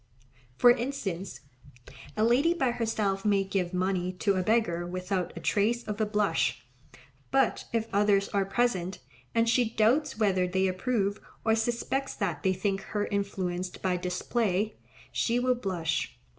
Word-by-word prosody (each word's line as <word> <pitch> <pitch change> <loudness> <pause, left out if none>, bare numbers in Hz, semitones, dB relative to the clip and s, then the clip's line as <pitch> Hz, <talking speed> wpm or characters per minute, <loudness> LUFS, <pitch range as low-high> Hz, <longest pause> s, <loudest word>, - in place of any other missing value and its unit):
For 245 - +7
instance, 225 -8 -3 0.8
a 215 - +2
lady 270 +9 +4
by 265 -7 +1
herself 215 -4 -1
may 200 -2 +3
give 190 -2 -1
money 185 0 0
to 200 +2 +1
a 185 - 0
beggar 185 -5 +1
without 180 +1 -2
a - - -5
trace 230 +4 +1
of 210 +1 -4
a 215 - +2
blush, 180 - 0 0.6
but 270 0 +2
if 230 -1 0
others 200 -1 +3
are 200 -1 +1
present, 195 -3 0 0.4
and 230 0 +3
she 230 0 +3
doubts 250 +6 +2
whether 190 -4 +2
they 190 +1 +1
approve, 200 +1 -1 0.2
or 220 - +4
suspects 240 +4 -1
that 175 -7 -2
they 190 - +2
think 195 +1 -1
her 205 -1 -2
influenced 185 -3 -3
by 185 -1 +1
display, 190 +3 -1 0.4
she 235 +1 +1
will 250 +1 +3
blush. 180 -9 -2
200 Hz, 150 wpm, -28 LUFS, 185-230 Hz, 0.8 s, For